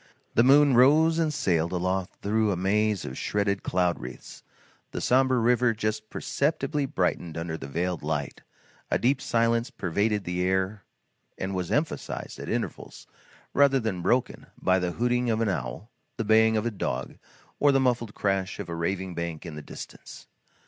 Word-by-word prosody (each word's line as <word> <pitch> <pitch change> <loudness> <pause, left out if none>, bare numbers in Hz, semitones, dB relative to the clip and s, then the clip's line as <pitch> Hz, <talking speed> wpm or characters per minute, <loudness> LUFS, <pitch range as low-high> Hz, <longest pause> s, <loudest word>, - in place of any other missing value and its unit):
The - - +5
moon 140 +2 +6
rose 155 +6 +5
and 160 -2 +1
sailed 85 - 0
aloft 95 +1 -2
through 110 +1 +2
a - - 0
maze 105 +2 +1
of 65 - -6
shredded 100 -1 0
cloud 90 -1 0
wreaths; - - -9 0.5
the - - -5
sombre 130 0 +3
river 120 0 +3
just 110 0 -3
perceptibly 150 -1 -1
brightened 90 -6 -1
under 80 -1 -3
the 70 -4 -7
veiled 90 +4 -2
light; 75 -3 -3 0.5
a - - +2
deep 135 +3 +1
silence 115 +1 +1
pervaded 105 - -1
the 90 0 -2
air 95 +2 0 0.5
and 95 +1 -3
was 90 -2 -3
emphasized, 150 +2 -2
at - - -6
intervals, - - -4 0.5
rather 140 -1 +4
than 110 -7 -2
broken, 120 +7 0
by 95 0 +3
the 90 -1 -2
hooting 120 0 +1
of 110 -1 +1
an 115 -2 +1
owl, 80 - -4 0.3
the 115 - -2
baying 110 +1 +5
of 110 - -1
a 120 - 0
dog, 65 - -4 0.4
or 145 - +5
the 135 - +3
muffled 120 -4 0
crash 95 -2 -1
of - - -6
a - - -3
carving 90 +2 -2
bank 85 -1 -5
in 85 - -6
the 75 - -6
distance. - - -10
105 Hz, 170 wpm, -27 LUFS, 90-120 Hz, 0.5 s, moon